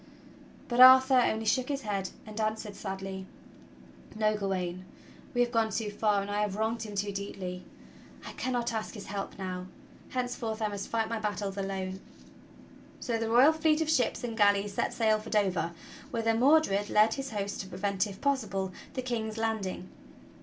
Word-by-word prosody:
But 240 0 -1
Arthur 260 0 +9
only 225 -2 +1
shook 255 +4 +1
his 280 -2 -2
head 200 -3 -2 0.2
and 215 +1 -5
answered 215 -1 -2
sadly: 190 -1 -6 0.9
"No, 215 0 +2
Gawain, 185 -3 -2 0.5
we 245 - +3
have 240 0 +2
gone 225 -2 +2
too 215 0 -2
far, 205 -1 +1
and 200 - -6
I 205 +1 0
have 205 -2 -1
wronged 220 +2 -1
him 210 -2 -6
too 200 +1 -1
deeply. 190 -2 -5 0.6
I - - -6
cannot 245 -2 -2
ask 220 0 -4
his 205 - -8
help 195 0 -5
now. 185 -1 -5 0.4
Henceforth 245 -3 -3
I 215 -1 0
must 200 -1 -5
fight 225 -1 0
my 230 0 -2
battles 205 -2 -3
alone." 190 -1 -3 1.0
So 230 -2 -2
the 225 0 -1
royal 255 +7 +6
fleet 315 -1 +2
of 315 -1 +1
ships 255 -6 +1
and 235 -2 -3
galleys 205 -1 +3
set - - 0
sail 220 -2 +2
for 220 +1 -9
Dover, 195 -5 +1 0.4
whither 225 -1 +1
Mordred 235 -5 +3
led 215 +1 +4
his 270 +1 -4
host 200 -2 -3
to 190 - -9
prevent, 195 +2 -1
if 195 -1 -9
possible, 195 -9 -1 0.2
the 255 - -2
King's 225 -3 -3
landing. 220 -5 -2
215 Hz, 175 wpm, -30 LUFS, 195-235 Hz, 1.0 s, Arthur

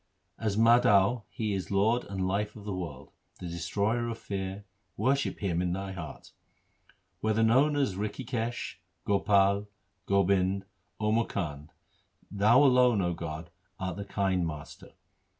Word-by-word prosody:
As 105 -2 -1
Madho 115 -1 +4
He 110 -2 -2
is 95 -4 -3
Lord 110 +5 +2
and 95 -2 -2
Life 105 +2 -1
of 105 - -10
the 105 - -3
world, 85 -8 -6 0.3
The - - -7
Destroyer 100 +8 -1
of 115 - -4
fear; 95 -1 -5 0.3
worship 135 +1 +1
Him 90 -4 0
in 90 -1 0
thy 95 +1 -4
heart. 90 -5 -8 0.9
Whether 110 0 +1
known 135 +7 +4
as 140 -8 +1
Rikhikesh, 115 +3 -3 0.3
Gopal, 100 0 +3 0.4
Gobind, 100 0 +2 0.3
Or 105 0 +1
Mukand, 75 -10 -2
2 - - -30 0.7
Thou 115 +7 +6
alone, 125 -4 +5
0 90 -3 +1
God, 80 0 -6 0.3
art 95 -1 -3
the 100 - -5
kind 95 -3 0
Master. 75 -2 -9
100 Hz, 140 wpm, -29 LUFS, 95-115 Hz, 0.9 s, Thou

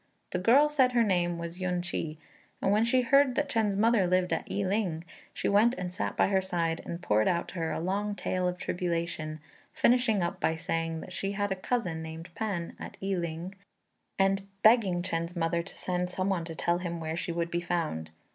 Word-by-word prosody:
The 180 - -1
girl 250 +10 +6
said 265 -4 +3
her 235 -1 +4
name 175 -4 +1
was 170 +1 -6
Yün 180 -1 -1
ch'i; 160 -3 -3 0.4
and 195 - +1
when 210 +2 +4
she 255 +2 +3
heard 275 +1 +4
that 295 - +1
Chên's 220 -7 +1
mother 220 -3 +4
lived 180 -1 +2
at 165 - -2
I 200 - -1
ling, 185 -5 0 0.3
she - - -3
went 220 +5 +4
and 180 -1 -5
sat - - -3
by - - +4
her 190 -1 +3
side, 170 -3 -1
and 170 +1 -6
poured 110 -4 +3
out 170 -1 0
to - - -9
her 165 -1 -1
a - - -2
long 200 +4 -1
tale 185 -2 -1
of 180 0 -2
tribulation, 170 -3 -2 0.3
finishing 235 -6 +3
up 170 - -2
by 160 - +1
saying 165 0 -2
that 180 - -9
she 195 +1 -2
had 205 0 -1
a - - +1
cousin 185 -5 -2
named 160 +1 -7
P'an, 190 -6 -3
at - - -8
I 195 0 -1
ling, 170 +1 -3 0.6
and 195 0 +2 0.2
begging 210 -6 +5
Chên's 170 0 -3
mother 170 0 +1
to 175 - -11
send 180 0 -1
some 185 +1 -1
one 180 -4 0
to 165 -1 -7
tell 170 +2 +1
him 170 -2 -4
where 160 0 -3
she 170 - -3
would 170 0 -2
be 175 - 0
found. 165 - -2
180 Hz, 215 wpm, -29 LUFS, 170-205 Hz, 0.6 s, girl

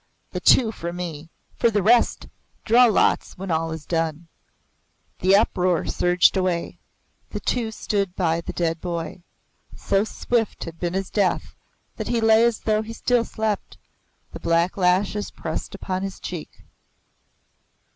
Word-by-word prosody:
The - - -3
two 230 -4 +5
for 170 -5 -5
me. 170 -3 -6 0.3
For 235 - +3
the 205 -3 0
rest 235 +3 +3 0.4
draw 240 +2 +6
lots 220 -3 +2
when 190 0 -5
all 165 0 0
is 160 -1 -6
done." 165 -1 -2 0.9
The 190 +2 +4
uproar 185 -4 +2
surged 180 +2 +3
away. 185 -3 -1 0.5
The - - -5
two 235 -3 -1
stood 200 -4 -2
by 170 -2 +1
the - - -6
dead 165 -2 -1
boy. 170 0 -4 0.5
So 195 0 +1
swift 225 0 -1
had 165 0 -9
been 175 0 -2
his 195 0 -3
death 200 -3 0 0.4
that - - -4
he 235 - +1
lay 225 0 +5
as 235 -2 0
though 215 -1 +1
he 225 +1 -7
still 245 +1 +1
slept 220 -2 -3 0.5
the - - -8
black 170 +2 +1
lashes 190 +2 +1
pressed - - -5
upon 185 -1 -3
his 195 0 -5
cheek. 175 -4 -8
185 Hz, 150 wpm, -23 LUFS, 170-220 Hz, 0.9 s, draw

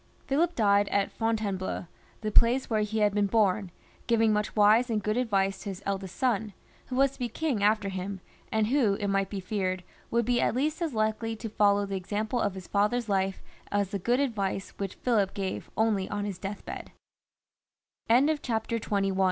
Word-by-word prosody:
Philip 330 +6 +1
died 205 -2 +4
at 200 -1 +1
Fontainebleau, 210 -6 -2 0.4
the 215 -1 -2
place 240 +4 +4
where 215 -1 +2
he 215 +1 -1
had 205 -1 +3
been 205 -1 +2
bom, 200 -2 +2 0.4
giving 225 -2 +3
much 210 0 -1
wise 215 +4 +5
and 215 -2 0
good 215 0 0
advice 195 -5 +1
to 200 - -6
his 195 0 -7
eldest 195 -2 -3
son, 220 -5 0 0.3
who 255 - -4
was 275 +1 +4
to - - -18
be 245 -1 -1
king 275 -4 -1
after 210 0 +3
him, 190 +1 -4 0.3
and 220 -1 +2
who, 230 -4 +2
it 200 0 -2
might 195 -1 +1
be 200 - -4
feared, 185 -1 -2 0.3
would 235 0 +1
be 245 0 +2
at - - +1
least 300 +6 0
as 320 -7 -2
likely 220 +1 0
to 225 +1 -6
follow 205 -1 +3
the 195 -1 -3
example 210 +5 -2
of 205 -2 0
his 190 -2 -8
father's 210 +3 +1
life 195 -1 0 0.3
as 200 -2 +1
the 200 - -2
good 240 +7 +1
advice 200 -8 -1
which 195 -2 -3
Philip 210 -6 +1
gave 190 -2 -4
only 215 -4 +1
on 205 0 -2
210 Hz, 175 wpm, -28 LUFS, 195-230 Hz, 0.4 s, wise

